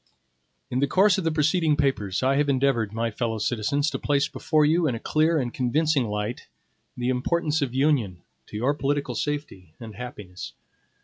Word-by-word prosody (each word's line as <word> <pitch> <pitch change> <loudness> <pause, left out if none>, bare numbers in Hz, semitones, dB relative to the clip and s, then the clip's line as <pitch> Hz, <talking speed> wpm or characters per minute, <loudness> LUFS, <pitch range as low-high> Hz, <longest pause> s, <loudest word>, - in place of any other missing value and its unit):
IN 125 - 0
THE 140 - +2
course 195 +6 +4
of - - -3
the 165 - +1
preceding 155 +1 +2
papers, 130 -9 0
I 135 +1 +3
have 145 0 +2
endeavored, 130 -6 +1
my 115 +1 -2
fellow 115 0 -2
citizens, 120 +7 0
to - - -3
place 140 -1 +1
before 155 -1 +1
you, 160 +2 +3
in 125 - 0
a - - -5
clear 160 +5 +2
and 125 -5 -2
convincing 140 +2 +1
light, 105 +3 -4 0.5
the 125 0 -1
importance 150 +5 0
of 130 -3 -2
Union 130 - +1 0.2
to - - -7
your 130 +6 +1
political 145 0 -1
safety 145 - -4
and 115 -2 -9
happiness. 105 -6 -8
135 Hz, 180 wpm, -25 LUFS, 115-150 Hz, 0.5 s, course